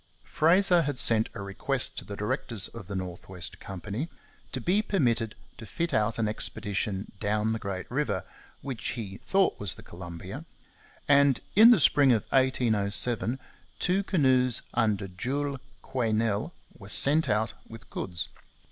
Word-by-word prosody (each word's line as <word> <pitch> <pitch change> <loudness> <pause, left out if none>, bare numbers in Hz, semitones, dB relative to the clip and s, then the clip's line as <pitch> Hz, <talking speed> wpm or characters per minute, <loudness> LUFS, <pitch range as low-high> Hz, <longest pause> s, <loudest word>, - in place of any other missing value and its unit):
Fraser 175 +2 +4
had 145 -4 -2
sent 115 -2 +4
a 100 - -5
request 115 +7 -1
to - - -10
the 100 - -7
directors 105 0 -1
of 115 -6 -10
the 100 - -5
North 90 -2 -6
West 90 -2 -5
Company 100 - -5 0.4
to 130 - -3
be 180 - +2
permitted 120 - 0 0.2
to 115 - -8
fit 165 - -2
out 110 +1 +1
an 110 -2 0
expedition 100 -1 -3
down 105 +1 0
the 110 - -3
great 100 -3 -4
river, 150 +4 -1 0.4
which 135 -5 -6
he 100 -5 -6
thought 195 0 +1
was 95 -7 -1
the - - -13
Columbia; 85 -1 -8 0.6
and 140 -2 +5 0.2
in 220 +3 +9
the 240 -5 +6
spring 140 -2 +5
of 110 - +1
1807 120 -2 +2 0.4
two 185 +2 +1
canoes 130 - +2
under 110 -4 +1
Jules 135 +9 -3 0.2
Quesnel 115 +2 0 0.2
were 100 -2 -12
sent 150 +8 +3
out 110 +1 +1 0.2
with 115 0 -11
goods. 85 -4 -4
115 Hz, 150 wpm, -28 LUFS, 100-140 Hz, 0.6 s, in